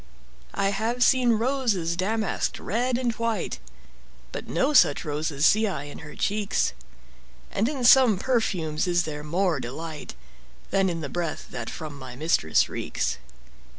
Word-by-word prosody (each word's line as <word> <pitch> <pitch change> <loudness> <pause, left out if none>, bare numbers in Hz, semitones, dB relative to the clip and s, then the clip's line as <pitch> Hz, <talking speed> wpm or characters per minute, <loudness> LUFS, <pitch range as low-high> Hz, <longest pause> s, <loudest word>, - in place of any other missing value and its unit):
I 195 - +1
have 225 +5 0
seen 250 -3 +4
roses 225 -8 0
damask'd, 215 +3 -1
red 240 +4 0
and 245 -2 0
white, 225 - -2 0.7
But - - -6
no 280 +3 +1
such 145 - +5
roses 150 0 -1
see 215 +4 +4
I 185 -8 -3
in 145 - -9
her 150 -1 -10
cheeks; 205 0 0 0.8
And 220 +5 +1
in 275 -4 -4
some 245 -4 +7
perfumes 180 -10 0
is 175 0 +2
there 150 -2 -5
more 170 0 0
delight 150 +5 -7 0.6
Than 195 -1 +3
in 165 -2 -3
the 145 - -3
breath 175 -3 -4
that 120 -2 -5
from 150 -3 -7
my 130 -2 -9
mistress 130 - +2
reeks. - - -3
190 Hz, 150 wpm, -26 LUFS, 155-230 Hz, 0.8 s, some